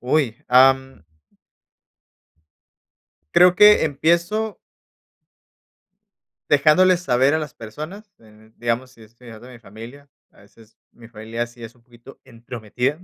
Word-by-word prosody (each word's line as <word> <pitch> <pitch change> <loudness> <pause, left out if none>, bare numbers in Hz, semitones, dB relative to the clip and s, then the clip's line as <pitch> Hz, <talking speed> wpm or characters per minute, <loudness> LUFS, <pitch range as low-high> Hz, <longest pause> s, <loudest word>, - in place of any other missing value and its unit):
¡Uy! 130 0 -2
Am. 130 -3 +2 2.3
Creo 180 0 +5
que 210 0 +6
empiezo 170 +9 -1 1.9
dejándoles 170 +5 +3
saber 135 -4 +1
a - - 0
las 150 -4 -7
personas, 155 - -10
d 110 0 -22
digamos, 120 +2 -3
si 115 -3 -20
estoy 115 +3 -18
hablando 115 +1 -13
de 125 - -14
mi 120 - -14
familia, 115 +7 -14 0.2
a - - -24
veces 110 +2 -22 0.2
mi 115 -1 -17
familia 115 +1 -6
sí 120 0 -17
es 115 +1 -12
un 120 - -28
poquito 120 +2 -18
entrometida 120 +3 -5
125 Hz, 125 wpm, -20 LUFS, 115-150 Hz, 2.3 s, que